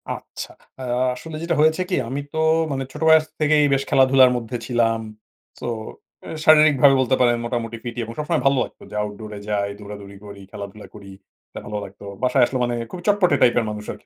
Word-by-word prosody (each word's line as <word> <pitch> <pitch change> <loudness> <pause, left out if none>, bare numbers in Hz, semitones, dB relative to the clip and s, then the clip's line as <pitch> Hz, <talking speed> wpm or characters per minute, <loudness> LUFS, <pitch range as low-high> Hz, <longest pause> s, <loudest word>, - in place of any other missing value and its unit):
আচ্ছা। - - -9 0.3
আ - - -5 0.3
আসলে 160 +4 -9
যেটা 170 0 0
হয়েছে 160 +3 +3
কি 180 - +1
আমি 140 +2 -3
তো 160 - -4 0.3
মানে 135 -1 -2
ছোট 150 - -10
বয়স 160 -1 +6
থেকেই 150 -1 +3
বেশ 135 - +1
খেলাধুলার 130 -1 +5
মধ্যে 120 +1 -5
ছিলাম। 115 -2 +1 0.6
সো - - -5 0.6
এ - - -8 0.2
শারীরিকভাবে 150 -3 +6
বলতে 130 +1 +2
পারেন 120 -1 +4
মোটামুটি 115 -1 -3
ফিটই 120 -1 -4
এবং 115 +1 -7
সবসময় 150 -1 -1
ভালো 135 -1 +4
লাগতো - - -11
যে - - -8
আউটডোর 105 +1 -7
এ - - -7
যাই, 100 -1 0
দৌড়াদৌড়ি 100 -1 -10
করি, 100 -1 -10
খেলাধুলা 100 +1 -9
করি, 100 0 -11 0.5
ভালো 105 0 -4
লাগতো। 100 +1 -13 0.2
বাসায় 125 0 +3
আসলে 130 0 -3
মানে 120 - -2 0.2
খুব 180 - -7
চটপটে 190 -7 +3
টাইপের 120 -2 +4
মানুষ 105 0 -6
আরকি - - -12
125 Hz, 190 wpm, -22 LUFS, 110-150 Hz, 0.6 s, বয়স